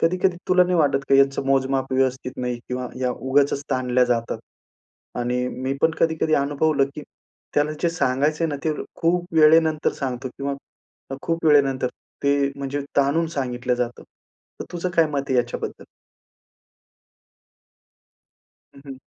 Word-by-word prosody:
कधी-कधी 180 +1 +2
तुला 180 0 +5
नाही 180 0 0
वाटत 145 -3 +3
का 140 - +5
यांचं 135 0 +3
मोजमाप 135 0 +1
व्यवस्थित 130 0 0
नाही 125 -1 -3
किंवा 125 0 -3
या 125 -1 +1
उगाचच 140 +2 +1
ताणल्या 125 0 +2
जातात? 115 -1 -1 0.8
आणि 125 +1 -1
मी 130 +1 -3
पण 160 - +5
कधी-कधी 160 -1 +2
अनुभवलं 140 +1 +2
की 150 - -7 0.5
त्याला 150 +1 +2
जे 170 - +3
सांगायचं 150 0 0
आहे 165 - +1
ना, 145 - -3
ते 160 - +2 0.3
खूप 175 +1 +1
वेळेनंतर 160 0 +4
सांगतो 130 -2 -4
किंवा 140 0 -2 0.7
खूप 165 -2 -2
वेळेनंतर 135 -4 +4 0.3
ते, 140 0 +2
म्हणजे 140 +1 -3 0.2
ताणून 145 +4 +3
सांगितल्या 125 -1 -1
जातं. 120 -1 -3 0.6
तर - - -3
तुझं 175 +1 -2
काय 165 -1 +5
मत 140 - +1
आहे 130 - +1
याच्याबद्दल? 120 0 -2 2.9
हं, 140 - -14
हं. 135 -2 -8
140 Hz, 140 wpm, -23 LUFS, 130-155 Hz, 2.9 s, तुला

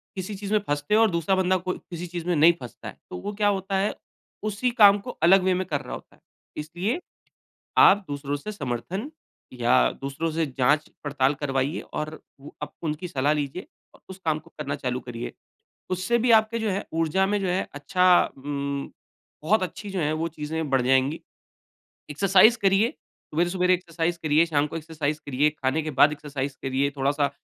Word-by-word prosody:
किसी 190 +2 -5
चीज़ 200 +1 -6
में 215 - +4
फँसते 145 +7 0
हो 220 - +5
और 225 - +5
दूसरा 170 +3 +1
बंदा 185 0 +2
कोई 185 +1 -4
किसी 175 0 -6
चीज़ 170 -1 -6
में 175 - +2
नहीं 160 +3 +6
फँसता 120 -4 -9
है। - - -9
तो - - -6
वो 205 - -4
क्या 205 0 +1
होता 195 -1 0
है, 200 +2 +1 0.5
उसी 215 +4 0
काम 205 -4 +7
को 245 - -9
अलग 185 +2 +6
वे 185 0 +3
में 185 +1 -1
कर - - -1
रहा - - -8
होता - - -13
है। - - -31 0.4
इसलिए, 175 - -2 0.8
आप 200 +1 +7
दूसरों 145 0 -3
से 180 +9 -6
समर्थन 190 - -4 0.4
या 125 +1 +3
दूसरों 140 +4 -3
से 160 +1 0
जाँच-पड़ताल 145 0 +1
करवाइए, 135 +2 -1
और 155 +1 -6 0.2
वो 145 - -12
आप - - -7
उनकी 155 +2 -3
सलाह 145 -2 +1
लीजिए 150 - -4 0.3
और - - -21
उस 190 - -9
काम 155 -1 +1
को - - -20
करना 145 -1 -3
चालू 130 -3 -3
करिए। 120 -2 -7 0.6
उससे 185 +6 +1
भी 235 +1 +2
आपके 225 +1 +4
जो 220 - -1
है 195 +1 -2
ऊर्जा 165 +4 +2
में 205 +1 +1
जो 190 - -1
है 180 +1 0
अच्छा 180 +6 +1 0.3
उम, 140 0 -4 0.5
बहुत 195 +5 +3
अच्छी 200 +3 -6
जो 190 -2 -3
हैं, 150 -1 +1
वो 160 +1 -1
चीज़ें 155 0 -4
बढ़ 135 -1 +3
जाएँगी। 130 +4 +2 0.9
एक्सरसाइज़ 195 +8 +5
करिए, 195 +4 +4 0.4
सवेरे-सवेरे 180 +2 +2
एक्सरसाइज़ 170 -1 -2
करिए, 155 +2 +4
शाम 145 -2 +1
को 150 - -6
एक्सरसाइज़ 155 -2 -3
करिए, 145 +2 +2
खाने 150 +1 -1
के 155 - -4
बाद 150 - +7
एक्सरसाइज़ 145 -2 -5
करिए, 135 +1 0
थोड़ा-सा 140 +1 +1
160 Hz, 190 wpm, -25 LUFS, 145-190 Hz, 0.9 s, काम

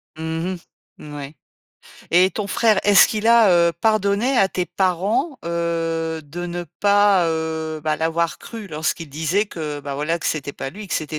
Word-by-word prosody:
Mmh 160 +3 -3
mh, - - -9 0.4
mouais. 145 0 -8 0.8
Et 180 +2 +5
ton 210 0 -4
frère, 215 +1 +2
est-ce 205 -1 +7
qu'il 215 0 -2
a, 230 -3 +6
heu, 170 -1 +4
pardonné 215 - +1
à 195 - +4
tes 180 -1 -2
parents, 195 - -1
heu, 165 -1 -2
de 175 +5 -6
ne 175 0 -5 0.2
pas, 205 -3 +4
heu, 160 -1 -3
bah, 155 0 0
l'avoir 165 +1 -1
cru 225 -4 -9
lorsqu'il 155 +1 -3
disait 160 +8 0
que, 150 -6 -5
bah, 140 -1 -5
voilà 160 +4 -1
que - - -3
c'était 140 -2 -2
pas 135 - -6
lui, 210 +5 -9
que - - -2
c'était 155 0 -3
170 Hz, 175 wpm, -21 LUFS, 160-200 Hz, 0.8 s, est-ce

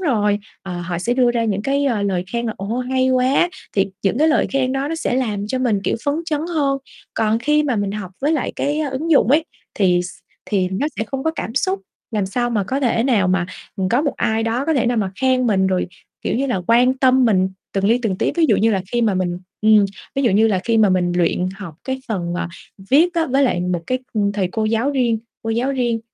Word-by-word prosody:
rồi, 210 - +1 0.2
ờ, 180 -2 -5
họ 175 0 -3
sẽ 235 +7 0
đưa 250 -1 +3
ra 235 -1 0
những 205 -2 -1
cái, 280 +4 +1
ờ, 235 -7 +1
lời 190 -3 0
khen 235 0 -1
là 220 - -1
"Ồ, 210 +5 -3
hay 260 +1 +1
quá!" 255 +6 +3 0.3
Thiệt 195 - +3 0.2
những 200 +6 +1
cái 310 - +4
lời 310 - +3
khen 260 -1 +1
đó 270 +2 -1
nó 330 - -2
sẽ 320 -6 -1
làm 210 -6 -1
cho 260 +4 -2
mình, 230 -6 +1
kiểu, - - +1
phấn 285 - +1
chấn 300 -3 -1
hơn. 275 -3 +1 0.4
Còn 220 0 +1
khi 300 +4 +2
mà 270 -6 0
mình 200 -1 -1
học 205 -3 -5
với 290 +3 +1
lại, 305 - -1
cái, 290 +2 -1
á, 305 - -1
ứng 285 +6 -3
dụng 275 -7 +5
ấy 310 +3 +4 0.3
thì 180 -3 +3
x 180 - -6 0.4
thì 190 -3 0
nó 190 +10 -1
sẽ 220 - 0
không 265 +4 -5
có 320 - +2
cảm 260 -8 -5
xúc, 380 +7 0 0.3
làm 210 -4 -1
sao 240 +5 -1
mà 210 -4 0
có 265 +8 -2
thể 235 -4 +2
nào 220 -8 +2
mà, 180 -1 +1 0.3
ừm, 190 -2 0
có 245 +7 +2
một 290 - -1
ai 220 +1 0
đó 230 +4 -1
có 320 - +2
thể 250 -4 +1
nào 245 - +1
mà 200 -4 0
khen 255 -1 +2
mình 190 -4 +2
rồi, 185 -1 0 0.4
kiểu - - -1
như 270 +3 0
là, 220 -8 -1
quan 245 +2 +4
tâm 260 -1 +4
mình 190 -5 +3 0.2
từng 195 0 -1
li 230 +4 +4
từng 205 -5 0
tí. - - +1
Ví 335 - +4
dụ - - +4
như 225 +2 +3
là 195 -3 0
khi 240 - +1
mà 215 -4 +2
mình 175 -1 -1 0.2
ừm, 215 -1 +6 0.3
ví 275 - 0
dụ 240 - +3
như 210 +3 +4
là 200 -4 +1
khi 230 -1 +2
mà 215 -2 +5
mình 180 -1 +1
luyện 180 +1 +1
học 190 -6 -8
cái 265 0 -2
phần, 175 -6 -2
à, 175 - -2 0.4
viết 335 +6 +4
á 330 -1 +1
với 270 +2 +2
lại 240 -10 +2
một, 180 -1 -1
cái, 255 - 0
ừm, 205 -2 +1
thầy 195 -3 -1
cô 220 - -1
giáo 225 +5 +1
riêng 245 -5 +1 0.2
cô 225 - -3
giáo 240 +5 0
riêng, 240 -4 0
230 Hz, 260 wpm, -20 LUFS, 200-265 Hz, 0.4 s, ừm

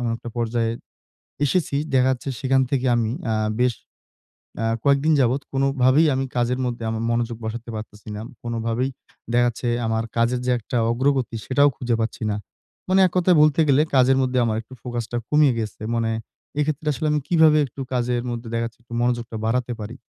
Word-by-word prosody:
এমন 120 -2 -1
একটা 120 - -9
পর্যায়ে 115 -1 0 0.7
এসেছি। 145 0 +1 0.2
দেখা 130 0 +4
যাচ্ছে 130 +2 -5
সেখান 135 -1 +3
থেকে 130 -2 0
আমি 115 -2 0 0.2
আ - - +1 0.3
বেশ 125 -2 +3 0.9
আ - - +1 0.2
কয়েকদিন 140 +3 +4
যাবৎ 130 +2 +2
কোনভাবেই 135 +2 +3
আমি 135 +1 0
কাজের 125 +1 +1
মধ্যে 120 -1 -3
আমার 110 0 -2
মনোযোগ 115 -1 -1
বসাতে 115 +2 -5
পারতেছি 105 -1 -9
না। 105 - -5 0.2
কোনভাবেই 115 +2 -1 0.4
দেখা 120 0 +4
যাচ্ছে, 120 +1 -5 0.2
আমার 110 0 0
কাজের 120 +2 +2
যে 125 - +2
একটা 120 +3 -3
অগ্রগতি 130 -1 0
সেটাও 145 +2 +4
খুঁজে 120 -2 -1
পাচ্ছি 115 0 -3
না। - - -1 0.5
মানে 190 +1 +4
এককথায় 180 -1 +3
বলতে 150 0 +4
গেলে, 140 +1 +5
কাজের 130 0 +5
মধ্যে 130 -1 0
আমার 110 -1 0
একটু 115 +3 -15
ফোকাসটা 120 -1 -4
কমিয়ে 150 -4 +4
গেছে। 110 -1 -5
মানে 115 -1 0 0.5
এক্ষেত্রে 150 +1 -1
আসলে 155 +5 -2
আমি 150 - +2
কিভাবে 160 -3 +5
একটু 135 +1 -9
কাজের 120 -1 0
মধ্যে 120 0 -5
দেখা 115 0 0
যাচ্ছে, 115 - -17
একটু 120 - -12
মনোযোগটা 120 -2 -1
বাড়াতে 125 +2 0
পারি? 115 +5 -7
125 Hz, 180 wpm, -23 LUFS, 115-135 Hz, 0.9 s, গেলে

